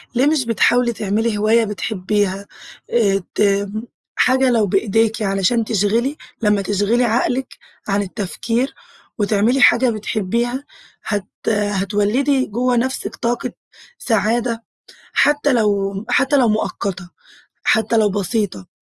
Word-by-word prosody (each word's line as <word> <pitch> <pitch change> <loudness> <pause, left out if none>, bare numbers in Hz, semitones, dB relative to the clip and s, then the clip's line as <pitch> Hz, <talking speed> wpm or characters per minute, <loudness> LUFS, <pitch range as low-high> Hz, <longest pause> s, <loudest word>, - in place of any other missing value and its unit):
ليه 250 +3 +3
مش 300 -4 +2
بتحاولي 235 +1 +2
تِعملي 215 +1 -1
هواية 220 +2 +3
بتحبيها، 200 -1 -2 0.4
آآ 200 -5 +2
ت 200 -1 +2 0.5
حاجة 260 0 +3
لو 225 -4 +2
بإيدِيكِ 225 +3 +1
علشان 195 +3 +1
تِشغِلي 225 +7 0 0.2
لمّا 210 -2 +2
تِشغِلي 205 +5 +1
عقلك 245 +3 0 0.4
عن 200 0 +1
التفكير 230 +6 -2 0.4
وتعملي 215 +5 +2
حاجة 245 +1 +5
بتحبيها، 230 +4 -2 0.4
هتَ 205 -3 -2 0.2
هتوَلِّدي 205 +6 +1
جوّه 245 +4 0
نفسك 260 +2 -2
طاقة 240 0 -2 0.5
سعادة، 230 +1 0 0.5
حتّى 290 -1 +3
لو 200 -3 +1
حتّى 280 +1 +3
لو 245 -3 +4
مؤقتة، 190 -4 -2 0.5
حتّى 220 +1 +2
لو 210 -2 +3
بسيطة. 200 - -2
220 Hz, 110 wpm, -19 LUFS, 200-240 Hz, 0.5 s, حاجة